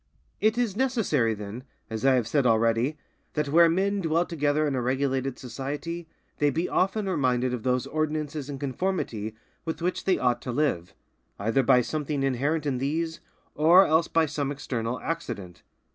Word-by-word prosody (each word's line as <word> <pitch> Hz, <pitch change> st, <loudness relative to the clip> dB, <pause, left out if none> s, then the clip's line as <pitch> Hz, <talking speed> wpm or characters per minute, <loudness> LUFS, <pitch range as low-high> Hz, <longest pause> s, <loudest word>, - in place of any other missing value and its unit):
It 220 Hz, +2 st, +2 dB
is 235 Hz, -6 st, 0 dB
necessary 205 Hz, -, +1 dB
then, 105 Hz, +4 st, -7 dB, 0.2 s
as 110 Hz, -1 st, -5 dB
I 135 Hz, -1 st, +5 dB
have 120 Hz, -3 st, +1 dB
said 135 Hz, +2 st, +2 dB
already, 115 Hz, +5 st, +2 dB, 0.4 s
that 150 Hz, -2 st, 0 dB
where 165 Hz, +3 st, +6 dB
men 195 Hz, +4 st, +1 dB
dwell 165 Hz, 0 st, +1 dB
together 150 Hz, -2 st, 0 dB
in 145 Hz, -, 0 dB
a 130 Hz, -, 0 dB
regulated 135 Hz, +1 st, -1 dB
society, 145 Hz, +6 st, -5 dB, 0.3 s
they 145 Hz, -, +4 dB
be 165 Hz, +6 st, -1 dB
often 195 Hz, +2 st, 0 dB
reminded 130 Hz, -7 st, +1 dB
of 125 Hz, -, -3 dB
those 125 Hz, +1 st, 0 dB
ordinances 155 Hz, -2 st, -2 dB
in 140 Hz, -, -4 dB
conformity 130 Hz, -, -2 dB, 0.3 s
with 160 Hz, -1 st, -4 dB
which 180 Hz, +2 st, -2 dB
they 190 Hz, -, +3 dB
ought 125 Hz, -1 st, +1 dB
to 125 Hz, -, -4 dB
live, 120 Hz, -, -1 dB, 0.4 s
either 115 Hz, +7 st, +1 dB
by 130 Hz, 0 st, +5 dB
something 145 Hz, +1 st, -2 dB
inherent 140 Hz, +4 st, 0 dB
in 135 Hz, -3 st, 0 dB
these, 160 Hz, +4 st, -2 dB, 0.3 s
or 170 Hz, +6 st, +6 dB
else 160 Hz, +1 st, +3 dB
by 165 Hz, -1 st, +2 dB
some 145 Hz, -2 st, -2 dB
external 125 Hz, -4 st, -3 dB
accident. 115 Hz, -, -5 dB
145 Hz, 170 wpm, -27 LUFS, 125-165 Hz, 0.4 s, where